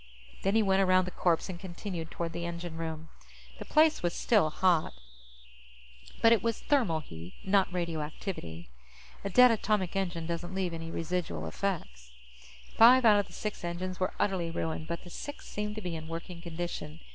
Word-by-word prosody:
_ - - -20
Then 195 +2 +1
he 225 - +5
went 195 -1 +3
around 185 -1 +4
the 185 - -5
corpse 170 -3 +1
and 180 -3 -6
continued 175 -2 -6
toward 165 0 -4
the 170 - -4
engine 170 -1 -5
room. 160 -1 -5 0.5
The - - -6
place 310 0 +4
was 175 -1 -1
still 210 -9 +3
hot, 175 0 +2 1.3
but 225 - +7
it 230 -4 +5
was 230 0 -1
thermal 225 - +1
heat, 85 - -10
not 190 -1 +3
radioactivity. 160 - -4 0.6
A 200 - -2
dead 250 +5 +7
atomic 210 -4 0
engine 175 -4 -1
doesn't 170 +2 -4
leave 185 -3 -1
any 165 0 -5
residual 165 - -3
effects. 80 - -4 0.7
Five 250 +2 +8
out 210 -2 +7
of 205 - -1
the - - -16
six 210 -3 -5
engines 180 +2 -4
were 185 - -1
utterly 190 -4 0
ruined, 160 -1 -3
but 170 0 -4
the 175 - -11
sixth 290 +9 -7
seemed 210 0 -3
to 215 - -5
be 180 -4 -4
in 160 0 -7
working 170 +1 -6
condition. 170 -2 -5
175 Hz, 180 wpm, -30 LUFS, 165-200 Hz, 1.3 s, Five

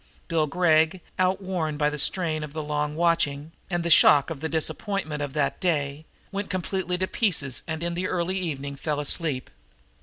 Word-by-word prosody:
Bill 160 -3 +1
Gregg, 160 +2 +3 0.2
outworn 185 -4 0
by 150 0 +2
the 150 - -3
strain 160 -2 +1
of 150 -1 -7
the 155 -1 -3
long 150 0 -2
watching 160 -3 +1 0.2
and 175 -2 -1
the 170 - 0
shock 145 0 +7
of 155 - -5
the 160 +2 -3
disappointment 160 -1 -2
of 145 -2 -3
that 145 -2 0
day, 150 -4 -1 0.3
went 200 0 -3
completely 185 0 -2
to 185 - 0
pieces 165 - 0
and 160 0 -3
in 170 0 -1
the 180 +2 -2
early 185 +1 -1
evening 140 -5 -4
fell 150 +1 -2
asleep. 145 -2 -1
160 Hz, 180 wpm, -26 LUFS, 150-180 Hz, 0.3 s, shock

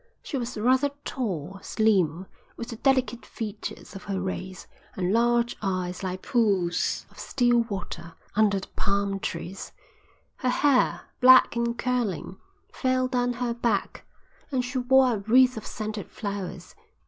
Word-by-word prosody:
She - - -5
was 245 -2 -3
rather 260 +6 +3 0.2
tall, 195 - -3
slim, 190 -7 +1 0.3
with 235 - -6
the 235 - -5
delicate 255 -3 +1
features 215 -2 -7
of 195 - -9
her 195 -2 -2
race, 185 0 -5 0.3
and 185 +1 0
large 235 +1 +2
eyes 185 -3 -2
like 185 -1 -4
pools 195 -7 +1
of - - -16
still 240 -2 +2
water 170 -4 -6 0.2
under 205 -2 +3
the 190 - -9
palm 200 0 0
trees; 190 0 -5 0.7
her 255 - 0
hair, 265 0 +3 0.2
black 255 -1 +7
and 235 0 -1
curling, 230 -7 -2 0.4
fell 255 -1 +1
down 245 -1 0
her 240 -1 -2
back, 235 -4 -1 0.5
and 255 -2 0
she 255 +1 -2
wore 255 0 +4
a - - -1
wreath 250 +5 +4
of 220 - -7
scented 215 -3 -5
flowers. 195 -4 -6
220 Hz, 145 wpm, -26 LUFS, 195-250 Hz, 0.7 s, black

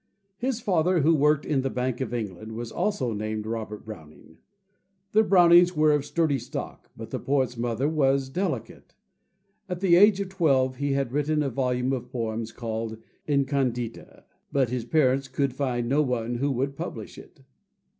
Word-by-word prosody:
His 250 -1 -2
father, 180 -3 +2
who 160 +4 +4
worked 150 0 +3
in 140 -3 +1
the 135 - -1
Bank 125 0 -2
of 130 - -3
England, 110 -2 -5
was 115 +1 -6
also 195 - -1
named 110 0 -3
Robert 110 -1 -5
Browning. 80 -6 -12 0.7
The 215 - +5
Brownings 175 -3 +6
were 155 0 +4
of 145 -1 +1
sturdy 155 -4 +1
stock; 120 - -7
but - - -8
the - - -3
poet's 130 -3 0
mother 120 +3 -1
was 140 -3 +2
delicate. 185 +9 -4 0.7
At 180 -1 -3
the 180 -2 +4
age 200 +2 +6
of 200 -2 -3
twelve 135 -9 +1
he 140 0 -1
had 135 -3 -1
written 150 +2 +1
a 135 - -2
volume 125 +1 0
of 125 -1 -5
poems 115 -2 -3
called 115 -1 -4 0.3
"Incondita"; 135 -5 -1 0.3
but 130 -4 +1
his 125 -2 -2
parents 135 -1 +2
could 135 0 -1
find 125 -3 -1
no 140 +5 +3
one 120 -4 -1
who 140 +4 0
would 135 +1 -1
publish - - -7
it. - - -16
135 Hz, 170 wpm, -26 LUFS, 120-150 Hz, 0.7 s, Brownings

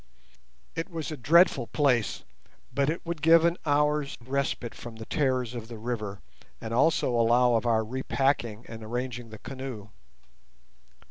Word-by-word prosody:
It 165 +4 -4
was 165 -3 -5
a - - -3
dreadful 145 -1 +4
place, 125 -8 +1 0.5
but 140 0 +1
it 165 +3 -3
would 170 -2 -4
give 165 +1 +6
an 170 0 +3
hour's 150 0 +1
respite 135 -2 -2
from 120 -1 -9
the 110 0 -8
terrors 130 -4 0
of 115 -2 -6
the 115 -1 -8
river, 105 -4 -4 0.4
and 115 0 -5
also 140 +2 +3
allow 120 +1 +4
of 115 +1 +1
our 110 -1 +3
repacking 125 -2 -1
and 110 -1 -9
arranging 120 +1 -4
the 110 - -9
canoe. 125 -4 -7
125 Hz, 150 wpm, -28 LUFS, 115-145 Hz, 0.5 s, give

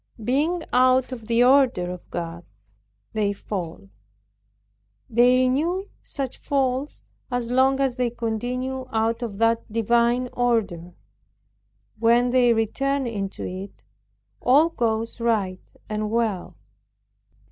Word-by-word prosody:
Being 305 +9 +1
out 255 +1 +4
of 230 -4 -7
the 235 +1 +3
order 250 -9 +4
of 180 -1 -10
God, 170 0 -5 0.7
they 205 -2 0
fall. 170 - -6 1.2
They 245 +2 +4
renew 335 +10 0
such 270 -3 -5
falls 270 0 -1 0.3
as 245 -2 -2
long 265 +1 +3
as 265 -2 0
they 250 -1 +1
continue 245 +3 -3
out 225 +1 0
of 220 -5 -5
that 230 0 +1
divine 235 +3 +2
order. 200 -8 -1 1.0
When 235 +2 +3
they 245 -1 +4
return 270 +5 0
into 200 -4 -4
it, 190 +2 -8 0.6
all 290 +6 +5
goes 230 -6 -2
right 210 -6 0 0.3
and 215 0 -2
well. 220 -5 -1
235 Hz, 115 wpm, -24 LUFS, 215-255 Hz, 1.2 s, all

